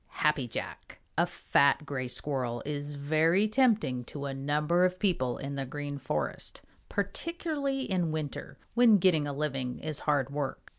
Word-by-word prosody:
Happy 150 Hz, -4 st, +3 dB
Jack. 115 Hz, -, -6 dB, 0.2 s
A -, -, +3 dB
fat 140 Hz, +2 st, +2 dB
Gray 130 Hz, -3 st, -3 dB
Squirrel 125 Hz, -2 st, -1 dB
is 145 Hz, 0 st, -4 dB
very 160 Hz, +7 st, +3 dB
tempting 215 Hz, -, +2 dB
to 140 Hz, +2 st, -6 dB
a 140 Hz, -, -3 dB
number 150 Hz, +6 st, +1 dB
of 185 Hz, 0 st, +2 dB
people 170 Hz, -, +1 dB
in 140 Hz, +1 st, -5 dB
the 140 Hz, -1 st, -2 dB
Green 145 Hz, +1 st, -5 dB
Forest, 75 Hz, -, -3 dB, 0.3 s
particularly 280 Hz, -, -2 dB
in 180 Hz, -8 st, 0 dB
winter, 155 Hz, -2 st, -5 dB, 0.2 s
when 235 Hz, -3 st, +6 dB
getting 170 Hz, -6 st, +3 dB
a -, -, -2 dB
living 135 Hz, -3 st, -2 dB
is 155 Hz, -2 st, -3 dB
hard 140 Hz, -3 st, +1 dB
work. 140 Hz, -1 st, -4 dB
150 Hz, 155 wpm, -30 LUFS, 135-185 Hz, 0.3 s, when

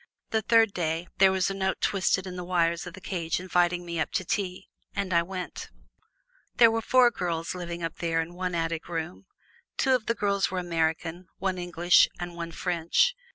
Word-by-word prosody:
The 220 Hz, -, +2 dB
third 225 Hz, -1 st, +4 dB
day, 165 Hz, 0 st, -2 dB
there 190 Hz, 0 st, +7 dB
was 190 Hz, 0 st, +1 dB
a -, -, -2 dB
note 190 Hz, -1 st, -1 dB
twisted 190 Hz, -1 st, +1 dB
in 185 Hz, -1 st, -6 dB
the 180 Hz, -, -5 dB
wires 170 Hz, -1 st, 0 dB
of 175 Hz, -, -8 dB
the -, -, -11 dB
cage 170 Hz, -4 st, -2 dB
inviting 175 Hz, -1 st, +1 dB
me 170 Hz, -1 st, -4 dB
up 155 Hz, -, -1 dB
to 185 Hz, -, -1 dB
tea. 185 Hz, -1 st, -2 dB, 0.3 s
And 195 Hz, -2 st, -2 dB
I 170 Hz, -, +5 dB
went. 180 Hz, +1 st, -6 dB, 0.9 s
There 230 Hz, -2 st, +7 dB
were 225 Hz, 0 st, 0 dB
four 250 Hz, +1 st, +5 dB
girls 170 Hz, -5 st, -3 dB
living 175 Hz, -1 st, -5 dB
up 165 Hz, -, -4 dB
there 165 Hz, -1 st, 0 dB
in 165 Hz, +1 st, -3 dB
one 180 Hz, 0 st, -3 dB
attic 165 Hz, 0 st, -2 dB
room. 175 Hz, +3 st, -5 dB, 0.5 s
Two 265 Hz, -, +3 dB
of 250 Hz, -4 st, 0 dB
these 230 Hz, -, +1 dB
girls 200 Hz, -1 st, +1 dB
were 185 Hz, -, -4 dB
Americans, 165 Hz, 0 st, -1 dB
one 190 Hz, -2 st, -2 dB
English 175 Hz, 0 st, +4 dB
and 175 Hz, 0 st, -5 dB
one 170 Hz, -1 st, -5 dB
French. 175 Hz, -, +1 dB
180 Hz, 200 wpm, -27 LUFS, 170-190 Hz, 0.9 s, there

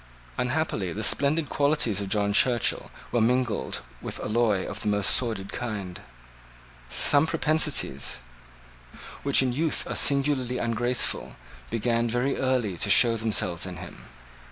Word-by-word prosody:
Unhappily 125 Hz, -, -2 dB
the 110 Hz, -, -4 dB
splendid 145 Hz, +6 st, +2 dB
qualities 140 Hz, -8 st, +1 dB
of 100 Hz, -, -5 dB
John 100 Hz, 0 st, 0 dB
Churchill 120 Hz, +1 st, +1 dB, 0.2 s
were 120 Hz, -, +1 dB
mingled 120 Hz, -1 st, 0 dB, 0.2 s
with -, -, -6 dB
alloy 105 Hz, -3 st, 0 dB
of 100 Hz, 0 st, -7 dB
the 110 Hz, -, -4 dB
most 105 Hz, -1 st, +3 dB
sordid 110 Hz, -6 st, +1 dB
kind. 100 Hz, -7 st, -5 dB, 0.9 s
Some 145 Hz, -, +4 dB
propensities, 155 Hz, -2 st, +1 dB, 1.0 s
which 140 Hz, -1 st, +3 dB
in 125 Hz, -2 st, -1 dB
youth 155 Hz, +4 st, -1 dB
are -, -, -4 dB
singularly 140 Hz, -3 st, +2 dB
ungraceful, 120 Hz, +1 st, -2 dB, 0.3 s
began 115 Hz, +1 st, -1 dB
very 125 Hz, +4 st, -1 dB
early 125 Hz, -9 st, -1 dB
to 105 Hz, -, -1 dB
show 115 Hz, +3 st, +5 dB
themselves 100 Hz, -6 st, -1 dB
in 90 Hz, -1 st, -8 dB
him. 90 Hz, 0 st, -11 dB
120 Hz, 130 wpm, -26 LUFS, 105-135 Hz, 1.0 s, show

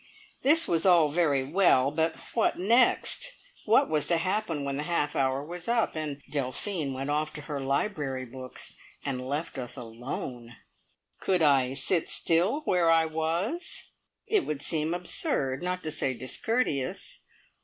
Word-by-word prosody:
This 325 Hz, +4 st, +4 dB
was 165 Hz, -1 st, +1 dB
all 175 Hz, -5 st, +6 dB
very 145 Hz, -4 st, +2 dB
well, 140 Hz, -3 st, +3 dB
but 160 Hz, +1 st, 0 dB, 0.2 s
what 230 Hz, -, +2 dB
next? 240 Hz, -, +3 dB, 0.3 s
What 220 Hz, -, +5 dB
was 155 Hz, -2 st, 0 dB
to 170 Hz, -, +3 dB
happen 180 Hz, -3 st, -1 dB
when 140 Hz, 0 st, -2 dB
the -, -, -1 dB
half 150 Hz, -4 st, 0 dB
hour 135 Hz, +1 st, +1 dB
was 175 Hz, +2 st, -7 dB
up, 235 Hz, -5 st, +1 dB
and 150 Hz, -3 st, -3 dB
Delphine 145 Hz, +3 st, -2 dB
went 135 Hz, +2 st, -3 dB
off 150 Hz, +1 st, 0 dB
to 150 Hz, -, -7 dB
her 145 Hz, -1 st, -4 dB
library 135 Hz, -2 st, -1 dB
books 130 Hz, +1 st, -4 dB, 0.3 s
and 130 Hz, -2 st, -2 dB
left 145 Hz, 0 st, -3 dB
us 125 Hz, +1 st, -4 dB
alone? 120 Hz, 0 st, -6 dB, 0.6 s
Could 180 Hz, -3 st, +1 dB
I 135 Hz, -3 st, +4 dB
sit 165 Hz, +5 st, +1 dB
still 180 Hz, -, +1 dB
where 180 Hz, -, +2 dB
I 165 Hz, 0 st, +5 dB
was? 165 Hz, -, -2 dB, 0.3 s
It 425 Hz, -4 st, +2 dB
would 145 Hz, -2 st, -3 dB
seem 160 Hz, +1 st, 0 dB
absurd, 175 Hz, -, -1 dB
not 180 Hz, +1 st, -2 dB
to 155 Hz, -, -2 dB
say 135 Hz, -4 st, -1 dB
discourteous. 135 Hz, -, -1 dB
155 Hz, 155 wpm, -28 LUFS, 135-180 Hz, 0.6 s, all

